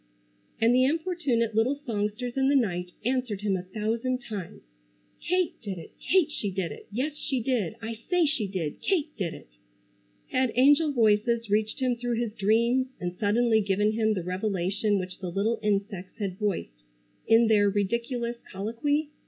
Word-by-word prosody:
And 230 +2 +4
the 255 +1 +5
importunate 290 -7 0
little 225 +6 +2
songsters 220 +2 -2
in 265 0 +2
the 285 - +3
night 180 -8 0
answered 250 -5 -1
him 205 -2 +1
a 185 - -2
thousand 225 +6 -2
times: 210 -8 -7 0.6
"Kate 365 -1 0
did 200 -5 -5
it! 165 - -10
Kate 360 -5 +2
she 210 -8 -3
did 185 -4 -2
it! - - -10
Yes 270 +8 -2
she 275 -3 -2
did! 230 -6 -1
I 225 +1 -3
say 335 +10 +1
she 280 -9 0
did. 180 -6 -4
Kate 315 -6 0
did 180 -6 -3
it!" - - -14 0.8
Had 255 -3 +1
angel 290 +5 +5
voices 230 -2 +2
reached 215 +3 +1
him 255 -1 +2
through 240 0 -1
his 235 -3 -2
dreams, 235 +5 +2
and 180 0 -3
suddenly 220 +2 +3
given 205 +1 +2
him 220 -1 +1
the 180 - -2
revelation 195 +2 0
which 185 -1 -5
the 185 -2 -4
little 210 +6 0
insects 200 -3 -2
had 195 -3 -4
voiced 180 - -2 0.5
in 225 +1 +6
their 210 -2 +4
ridiculous 235 +4 -1
colloquy? 235 +10 -1
220 Hz, 170 wpm, -27 LUFS, 200-255 Hz, 0.8 s, in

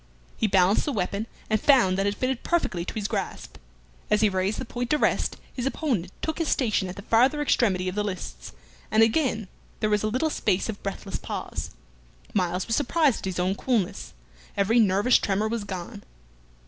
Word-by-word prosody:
He 220 - +1
balanced 190 0 +3
the 295 - -1
weapon, 205 -1 -2 0.2
and 215 -1 +1
found 245 -10 +5
that 195 +1 +1
it 200 - 0
fitted 255 -1 -1
perfectly 255 - 0
to - - -5
his 210 -2 -1
grasp. 205 -4 -4 0.5
As 210 0 +3
he 215 - +5
raised 190 +2 0
the 260 - -4
point 245 +1 -4
to 300 - +3
rest, - - +1 0.2
his 250 0 -2
opponent 240 - -1
took 315 +1 -2
his 330 - 0
station 215 -9 +1
at 180 - -6
the 200 - -9
farther 255 +7 +3
extremity 200 -10 +2
of 185 - -1
the 210 +1 -1
lists, 180 - -6 0.4
and 220 +1 +5
again 225 -3 +1 0.3
there 215 - 0
was 210 -1 +3
a 215 - 0
little 255 +8 0
space 185 -4 0
of 210 - -5
breathless 195 -1 -4
pause. - - -5 0.6
Myles 180 -2 0
was 225 - 0
surprised 290 -2 +2
at - - -7
his 185 -2 -3
own 185 +2 +1
coolness; 210 -3 -1 0.4
every 210 +4 +3
nervous 205 +3 +4
tremor 205 +2 0
was 220 -2 -3
gone. 200 +2 -6
210 Hz, 195 wpm, -26 LUFS, 190-245 Hz, 0.6 s, found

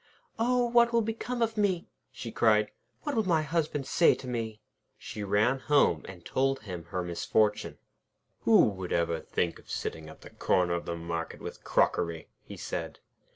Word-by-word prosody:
'Oh! 245 +1 +3
what 235 0 +4
will 230 -1 +3
become 230 +2 -2
of 225 -1 -2
me?' 190 -5 +1 0.2
she 115 - -7
cried. 105 -2 +3 0.3
'What 295 - -2
will 220 -4 +1
my 160 -3 +3
Husband 150 -2 -1
say 170 - +4
to 130 - -9
me?' 115 -3 -3 0.4
She 105 - -7
ran 105 +6 +2
home, 135 - +3
and 90 -3 -11
told 135 0 0
him 90 -6 -7
her 90 +2 -3
misfortune. 105 +5 0 0.6
'Who - - +6
would 95 -3 -6
ever 85 -1 +1
think 85 +1 -2
of - - -20
sitting 80 -1 -4
at 80 - -13
the - - -12
corner 90 -1 +1
of 85 - -2
the 85 - -2
market 85 0 -4
with - - -8
crockery?' 85 -2 +1
he - - -10
said. - - -5
110 Hz, 175 wpm, -29 LUFS, -, 0.6 s, Who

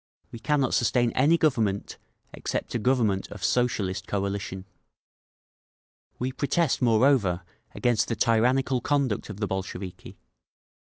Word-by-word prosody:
We 115 - -8
cannot 145 0 +1
sustain 120 0 +2
any 145 +8 +3
government 115 -11 0 0.3
except - - -4
a 120 - 0
government 110 -5 +1
of 105 - -9
Socialist 100 -6 0
coalition…. 100 -1 -3 1.5
"We 130 +1 -2
protest, 145 +4 0
moreover, 115 -6 +3 0.3
against 120 -3 +1
the 115 - -1
tyrannical 125 +4 +2
conduct 140 -9 0
of 105 -1 -7
the 105 - 0
Bolsheviki. 95 -1 -6
115 Hz, 115 wpm, -26 LUFS, 100-130 Hz, 1.5 s, any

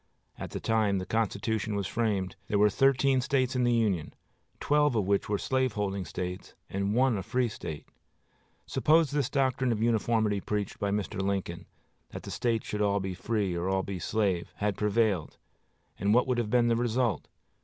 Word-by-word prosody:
At - - -5
the - - -5
time 110 -3 +1
the 95 - -3
Constitution 110 0 -1
was 100 -1 -1
framed 100 -5 -1
there 105 - +1
were 105 +1 +4
thirteen 135 +2 +3
States 130 -1 0
in 125 - +2
the 120 - +3
Union, 100 -9 0 0.4
twelve 145 -3 +2
of 105 -4 +1
which 100 +2 0
were 105 - +1
slaveholding 105 -7 -1
States 90 +3 -6 0.2
and 100 +2 -1
one 125 -4 +3
a - - -3
free 125 +6 0
State. 80 -8 -7 0.8
Suppose 160 -1 +3
this 145 -4 0
doctrine 130 -2 +1
of 110 - -1
uniformity 110 -2 +1
preached 105 0 -3
by 100 - 0
Mr. 100 0 -2
Lincoln, 95 -3 -3 0.4
that - - -8
the - - -7
States 115 -3 -1
should 105 - -3
all 100 0 +2
be 95 -1 -3
free 100 0 -1
or 85 +2 -2
all 95 0 +1
be 95 -2 -5
slave, 95 -4 -1
had 105 -1 -1
prevailed; 105 -5 0 0.6
and 100 +3 +2
what 125 - +4
would 125 -2 0
have 115 -3 -1
been 120 +1 +3
the 115 - +3
result? 120 0 0
105 Hz, 185 wpm, -29 LUFS, 100-120 Hz, 0.8 s, were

